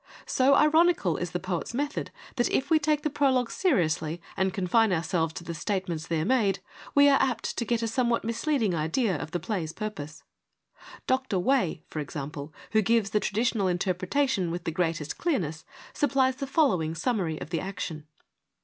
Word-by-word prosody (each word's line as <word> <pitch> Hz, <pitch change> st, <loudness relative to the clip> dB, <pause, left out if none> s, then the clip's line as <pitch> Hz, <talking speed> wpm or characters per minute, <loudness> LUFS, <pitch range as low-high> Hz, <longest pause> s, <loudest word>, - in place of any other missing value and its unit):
So 270 Hz, +2 st, +4 dB
ironical 310 Hz, -, +4 dB
is 175 Hz, -, -3 dB
the 180 Hz, -, -3 dB
poet's 185 Hz, +4 st, -3 dB
method 290 Hz, +3 st, -2 dB, 0.3 s
that, 240 Hz, -, +2 dB
if 275 Hz, +3 st, 0 dB
we 315 Hz, -, +6 dB
take 300 Hz, 0 st, +1 dB
the 305 Hz, -, +1 dB
prologue 260 Hz, -4 st, +2 dB
seriously 165 Hz, -, +1 dB, 0.2 s
and 190 Hz, 0 st, +1 dB
confine 195 Hz, +4 st, +2 dB
ourselves 165 Hz, -1 st, 0 dB
to 170 Hz, -, -7 dB
the 170 Hz, -, -5 dB
statements 170 Hz, -2 st, -3 dB
there 160 Hz, -1 st, 0 dB
made, 210 Hz, -5 st, +2 dB, 0.4 s
we 285 Hz, 0 st, +7 dB
are 275 Hz, -1 st, +5 dB
apt 250 Hz, -4 st, -1 dB
to 235 Hz, -, -2 dB
get 235 Hz, 0 st, 0 dB
a -, -, +1 dB
somewhat 235 Hz, 0 st, +1 dB
misleading 230 Hz, -, 0 dB
idea 175 Hz, -, 0 dB
of 150 Hz, -, -5 dB
the 175 Hz, -, -2 dB
play's 165 Hz, -3 st, -3 dB
purpose. 165 Hz, -8 st, -6 dB, 0.8 s
Dr. 260 Hz, -6 st, 0 dB
Way, 185 Hz, -, +1 dB
for 155 Hz, -, -5 dB
example, 145 Hz, +1 st, -6 dB, 0.2 s
who 220 Hz, -, +4 dB
gives 220 Hz, 0 st, +2 dB
the 210 Hz, -, +3 dB
traditional 215 Hz, -1 st, 0 dB
interpretation 185 Hz, +4 st, 0 dB
with 175 Hz, +1 st, -4 dB
the 165 Hz, -, -2 dB
greatest 165 Hz, -2 st, -2 dB
clearness, 165 Hz, -, -1 dB, 0.3 s
supplies 265 Hz, -2 st, +2 dB
the 275 Hz, -1 st, -4 dB
following 185 Hz, -, +2 dB
summary 175 Hz, -5 st, -1 dB
of -, -, -8 dB
the 165 Hz, -, 0 dB
action. 180 Hz, -5 st, -5 dB
195 Hz, 175 wpm, -27 LUFS, 165-260 Hz, 0.8 s, we